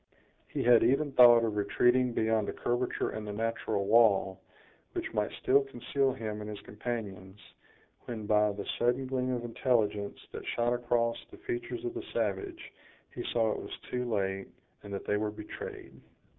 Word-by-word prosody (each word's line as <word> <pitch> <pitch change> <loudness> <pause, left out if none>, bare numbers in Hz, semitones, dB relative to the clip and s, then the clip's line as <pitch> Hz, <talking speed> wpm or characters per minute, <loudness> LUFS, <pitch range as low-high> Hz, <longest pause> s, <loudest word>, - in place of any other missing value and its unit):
He - - -3
had 120 -1 +6
even 140 +3 +2
thought 120 -2 +8
of 110 -2 -1
retreating 120 +5 +3
beyond 110 -2 +1
a - - -3
curvature 120 +1 -1
in 110 - -5
the 105 - -5
natural 110 -2 -1
wall, 100 -3 +4 0.5
which - - -4
might 105 -1 0
still 140 +2 +5
conceal 135 +1 0
him 110 -4 -5
and 105 - -6
his 105 -1 -6
companions, 105 -3 -6 0.7
when 110 -3 -5
by 105 0 +3
the 100 - -6
sudden 120 +2 +2
gleam 130 -1 -1
of 120 -1 -2
intelligence 110 -4 0
that - - -7
shot 120 +1 +2
across 120 -1 0
the 370 - -13
features 360 -1 -4
of 360 - -2
the 365 - -4
savage, 345 -4 -3 0.4
he - - -5
saw 115 -2 +2
it - - -3
was - - -7
too 125 0 -1
late, 95 -2 -1 0.3
and 100 - -10
that 100 - -5
they 105 - +1
were 105 0 -1
betrayed. 105 0 -8
115 Hz, 170 wpm, -30 LUFS, 105-125 Hz, 0.7 s, thought